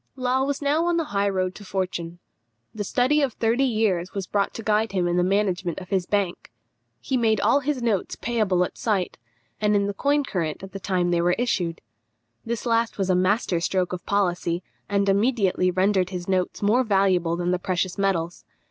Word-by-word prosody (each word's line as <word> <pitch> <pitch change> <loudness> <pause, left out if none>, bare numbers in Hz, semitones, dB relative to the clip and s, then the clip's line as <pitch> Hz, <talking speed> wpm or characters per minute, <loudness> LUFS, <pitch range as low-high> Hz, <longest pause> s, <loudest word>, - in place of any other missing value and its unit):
Law 255 0 +1
was 285 +1 -2
now 305 +4 +2
on 345 -1 +2
the 330 - +1
high 200 0 +2
road 185 -1 -1
to 205 - -11
fortune. 180 -3 -3 0.6
The 210 - -3
study 255 +8 +2
of 270 -5 0
thirty 230 +4 +1
years 210 -7 0
was 195 -2 -2
brought 200 +2 0
to 225 - -6
guide 215 0 +1
him 180 -2 +1
in 175 - 0
the 180 - +3
management 185 -2 0
of 185 -1 -8
his 190 -2 0
bank. 200 -4 -1 0.5
He 260 - -1
made 220 -3 +2
all 280 - +3
his 275 -2 -2
notes 215 -5 0
payable 210 -5 +1
at - - -10
sight, 200 -5 -1 0.4
and 210 0 +2
in 200 0 +2
the 200 - -2
coin 285 +7 +1
current 170 - -3
at 195 - -8
the 195 - -6
time 180 -2 0
they 170 -1 +2
were 175 +1 +3
issued. 180 -9 -1 0.6
This 230 0 -4
last 230 -1 +1
was 190 -2 +1
a - - +3
master 185 0 +1
stroke 185 0 0
of 180 - -5
policy, 180 -3 0 0.3
and 200 -1 +1
immediately 200 -3 +2
rendered 185 0 +2
his 180 -2 -6
notes 185 +1 -1
more 230 +6 +3
valuable 190 -6 +2
than 175 +1 -1
the 180 - 0
precious 185 +1 -2
metals. 175 -3 -1
195 Hz, 200 wpm, -24 LUFS, 180-225 Hz, 0.6 s, the